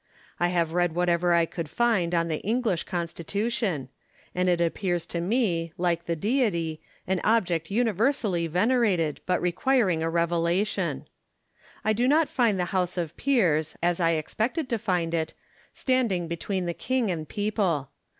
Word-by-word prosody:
I 175 - +3
have 170 -2 0
read 175 -2 +1
whatever 175 0 +2
I 170 -1 +4
could 165 -2 -6
find 180 -2 +1
on 170 0 +1
the 155 -2 -2
English 220 -4 0
Constitution; 175 - -2 0.5
and 180 0 +1
it 175 -1 +2
appears 175 0 0
to 170 - -3
me, 175 -5 0
like 170 -1 0
the 170 - 0
Deity, 170 - 0 0.2
an 190 -1 0
object 180 -8 +1
universally 215 -4 +1
venerated, 185 - +1
but 180 -1 +2
requiring 185 -1 +1
a 165 - 0
Revelation. 170 +4 0 0.8
I 215 - +3
do 240 +4 +1
not 305 +3 +3
find 225 -6 +2
the 180 - +1
House 180 -1 0
of 165 -3 -3
Peers, 170 - +1
as 175 0 +2
I 165 -1 +3
expected 245 - -2
to 230 - 0
find 180 -6 -1
it, 160 -1 -1 0.4
standing 235 -10 0
between 180 +3 -3
the 170 - -2
king 255 0 -1
and 155 -3 -4
people. 200 - -1
180 Hz, 155 wpm, -26 LUFS, 170-215 Hz, 0.8 s, I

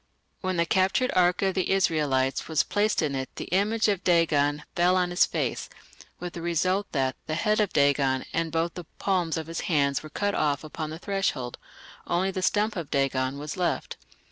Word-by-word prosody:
When 185 -1 -2
the 170 - +3
captured 190 +8 +2
ark 180 +1 +3
of 190 -1 +2
the 185 -2 -1
Israelites 145 -8 +1
was 160 -2 +2
placed 210 -3 +1
in 145 -2 -1
it 130 -1 -3
the - - -5
image 215 +4 +2
of 200 -3 0
Dagon 150 -4 +2
"fell 175 +1 +3
on 180 -1 +1
his 175 - +4
face", - - -2 0.5
with 175 -1 -6
the 170 - -6
result 185 +4 0
that 135 -3 0
"the 155 - -1
head 215 +5 +1
of 210 -3 +1
Dagon 140 -2 +2
and 165 -1 -1
both 165 +1 0
the 180 - -8
palms 180 -4 0
of 160 - -3
his 165 +1 -5
hands 140 -4 +2
were 155 - -10
cut 205 +6 -1
off 145 -4 0
upon 155 0 -5
the 160 - -6
threshold; 170 -10 -2 0.5
only 185 +3 +1
the 185 - -3
stump 210 +3 +1
of 165 -6 -5
Dagon 135 -1 0
was 150 +3 -6
left". 180 -1 -1
170 Hz, 195 wpm, -26 LUFS, 145-185 Hz, 0.5 s, his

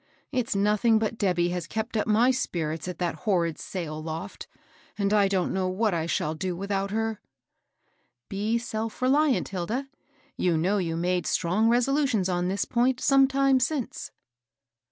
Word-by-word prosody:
It's 250 -6 -1
nothing 210 +3 +3
but 220 +1 -2
Debby 180 -3 +2
has 175 -2 -3
kept 220 +6 -4
up 215 - 0
my 225 +4 +4
spirits 165 -10 -2
at 180 - -5
that 175 -2 -1 0.2
horrid 170 -5 +1
sail 155 -5 -5
loft, 165 +4 -6 0.5
and 200 0 +1
I 205 -2 +4
don't 190 -2 0
know 190 -1 0
what 200 +3 0
I 165 -1 -1
shall 155 -1 -1
do 180 +2 -3
without 195 +1 -2
her." 225 0 -2 0.6
" - - -44 0.3
Be 210 +4 -1
self 225 -1 -4
reliant, 280 +1 +3
Hilda. 215 +9 -3 0.5
You 175 -3 +2
know 190 +6 +1
you 165 -3 -2
made 180 +1 0
strong 190 +6 +2
resolutions 245 -4 +2
on 175 0 0
this 195 +2 -1
point 250 +1 +1
some 275 -1 +5
time 270 -1 +3
since." 265 -1 -2
200 Hz, 165 wpm, -26 LUFS, 180-235 Hz, 0.6 s, some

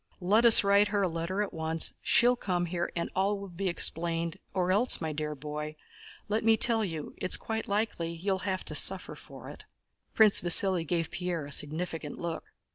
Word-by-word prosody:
Let 205 +6 +2
us 230 -2 +8
write 200 +1 +3
her 205 -1 -1
a - - +1
letter 170 +4 -3
at 205 - -8
once, 160 0 0
and - - -33
she'll 245 +1 +3
come 180 -6 -3
here 175 0 -4
and 170 - -4
all 200 +2 0
will 200 -1 -9
be 185 +3 -5
explained, 170 -1 -1
or 185 -1 -1
else, 215 +7 +2
my 160 -2 -4
dear 150 0 -5
boy, 150 +1 -7 0.5
let 215 +2 -2
me 225 0 +3
tell 225 0 +3
you 160 -6 -6
it's 185 - 0
quite 225 0 -5
likely 200 -5 -2
you'll 190 +3 -3
have 185 -1 -4
to - - -3
suffer - - +1
for - - -13
it." - - -11 0.5
Prince 215 -2 +4
Vasíli 175 -1 +6
gave 165 -1 -2
Pierre 180 -4 -4
a 145 - -11
significant 155 +1 -2
look. 170 -1 -7
180 Hz, 200 wpm, -28 LUFS, 165-200 Hz, 0.5 s, us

